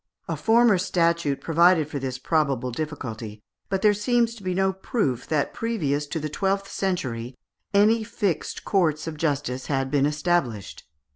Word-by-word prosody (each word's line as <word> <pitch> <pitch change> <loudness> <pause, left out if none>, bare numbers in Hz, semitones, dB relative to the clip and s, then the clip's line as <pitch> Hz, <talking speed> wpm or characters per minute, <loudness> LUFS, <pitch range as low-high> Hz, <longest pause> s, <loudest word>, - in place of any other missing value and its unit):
A - - -2
former 225 -3 +4
statute 170 -5 +1
provided 170 -1 +4
for 150 -2 -4
this 130 -1 -4
probable 135 -4 0
difficulty, 115 -7 -6 0.3
but 195 -1 -1
there 210 -1 +6
seems 230 +3 +1
to 230 - -12
be 185 -1 -2
no 190 0 +2
proof 190 - -2
that 150 -3 0
previous 150 -11 -1
to 160 - -3
the 155 - -3
twelfth 195 +5 -1
century 130 -10 -3 0.3
any 215 +3 +4
fixed 205 -6 -2
courts 160 -6 +1
of 160 -1 -5
justice 145 -4 -2
had 135 -2 -1
been 145 -1 +3
established. 150 - -2
160 Hz, 155 wpm, -25 LUFS, 140-195 Hz, 0.3 s, there